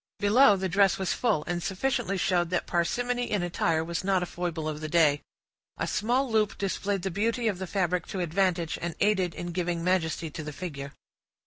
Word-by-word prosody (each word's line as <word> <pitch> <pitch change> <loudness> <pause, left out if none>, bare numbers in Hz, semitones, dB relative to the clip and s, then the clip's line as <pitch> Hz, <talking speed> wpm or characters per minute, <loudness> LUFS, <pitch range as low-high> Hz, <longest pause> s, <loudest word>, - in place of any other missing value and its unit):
Below, 210 +2 +5
the 190 0 -2
dress 195 +2 +3
was 190 -2 -1
full, 215 -11 +1
and 175 0 -2
sufficiently 195 +1 -1
showed 175 -2 +1
that 180 -1 -1
parsimony 245 +8 0
in 205 -4 0
attire 165 -2 0
was 170 +1 -3
not 190 -1 +2
a - - -1
foible 170 -3 -4
of 155 0 -4
the 155 - -4
day. 150 -3 +4 0.6
A - - -1
small 245 +6 +1
loop 215 -2 +1
displayed 195 -1 -2
the 190 - -1
beauty 230 +5 0
of 195 -4 -1
the 190 - -4
fabric 180 -2 0
to 190 - -4
advantage, 175 -1 0
and 170 -1 -3
aided 190 -4 +2
in 175 0 -5
giving 170 -1 -2
majesty 170 -3 0
to 155 - -6
the 150 0 -6
figure. 140 -5 -6
180 Hz, 200 wpm, -28 LUFS, 170-200 Hz, 0.6 s, Below